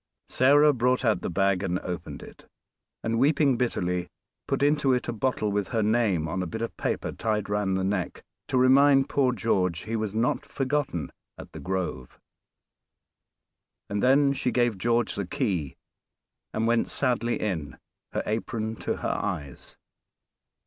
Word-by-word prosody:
Sarah 145 +3 +5
brought 125 +1 +1
out 110 -2 +2
the - - -3
bag 95 +1 +1
and 90 -2 -1
opened 90 -2 -6
it, - - -14 0.6
and, 115 0 0
weeping 140 0 +3
bitterly, 90 -7 -1 0.4
put - - 0
into 145 -2 +3
it 125 - -1
a 120 - -2
bottle 110 -2 -1
with 100 -1 -1
her 115 -3 0
name 105 -7 +1
on 95 +3 -2
a 90 - -3
bit 110 +8 -4
of 115 - -5
paper - - -2
tied 105 -2 -2
round 105 -2 0
the 95 - -1
neck, 95 -2 -2 0.2
to 130 - 0
remind 135 +2 +5
poor 135 -3 +2
George 95 -6 0
he 115 +1 -4
was 110 -2 -3
not 115 +2 +1
forgotten 135 - -2 0.3
at - - -11
"The - - -9
Grove," 90 -9 -4 1.7
and 100 0 -1
then 140 +2 +4
she 130 - -1
gave 120 -2 +1
George 120 +3 +1
the 100 -3 -4
key 85 -6 -2 0.7
and 110 - -1
went 115 0 +2
sadly 120 -3 0
in, 85 -9 -3 0.3
her - - -2
apron 110 0 -3
to - - -2
her - - -3
eyes. 80 -10 -6
110 Hz, 160 wpm, -26 LUFS, 95-125 Hz, 1.7 s, Sarah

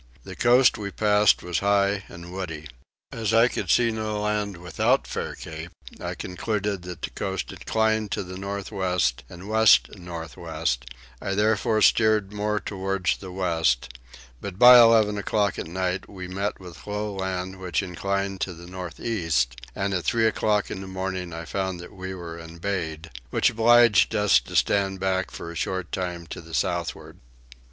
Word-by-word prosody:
The - - -9
coast 125 +1 +4
we 100 -1 -4
passed 105 0 +3
was 90 -1 -1
high 100 0 +2
and 85 +1 -10
woody. 80 -5 -5 0.4
As 110 -1 -1
I 115 +1 +6
could - - -4
see 115 -1 +4
no 110 -1 -3
land 105 -2 -1
without 90 +1 +1
Fair - - -4
Cape 80 +1 -8 0.3
I - - -4
concluded 100 +1 -3
that 90 -2 -9
the - - -3
coast 95 -2 -4
inclined 110 -1 0
to - - -2
the 90 0 -8
north 100 +1 -5
west 90 - 0
and 90 +3 -10
west 110 0 +5
north 85 -4 -8
west: 65 0 -2 0.4
I 95 - -2
therefore 110 +1 +2
steered 110 -3 +3
more 105 0 -1
towards 95 -2 -1
the 95 -2 -9
west; 80 -9 +1 0.5
but 95 -2 -6
by 125 +2 +10
eleven 110 -3 +5
o'clock 100 -1 0
at - - -5
night 90 +2 -2
we 95 -3 -7
met 100 +3 -3
with 90 -1 -12
low 105 0 -3
land 95 -1 -4
which 95 +1 -1
inclined 100 +1 -2
to 95 - -2
the 85 +1 -12
north 90 -1 -8
east, 80 - 0 0.2
and 100 0 -1
at 90 -2 -1
three 115 -1 +2
o'clock 105 -1 +1
in 95 - -5
the 95 - -8
morning 95 -1 -4
I 85 0 -6
found 95 0 -3
that 85 - -10
we 95 0 -6
were 85 -2 -7
embayed, 85 -1 -4 0.2
which - - +2
obliged 115 -2 +5
us 105 -6 +5
to - - -10
stand 95 -1 +2
back 95 -1 0
for 85 - -7
a - - -10
short 95 0 -3
time 90 -2 -3
to - - -8
the 80 0 -7
southward. - - -2
95 Hz, 175 wpm, -25 LUFS, 90-105 Hz, 0.5 s, by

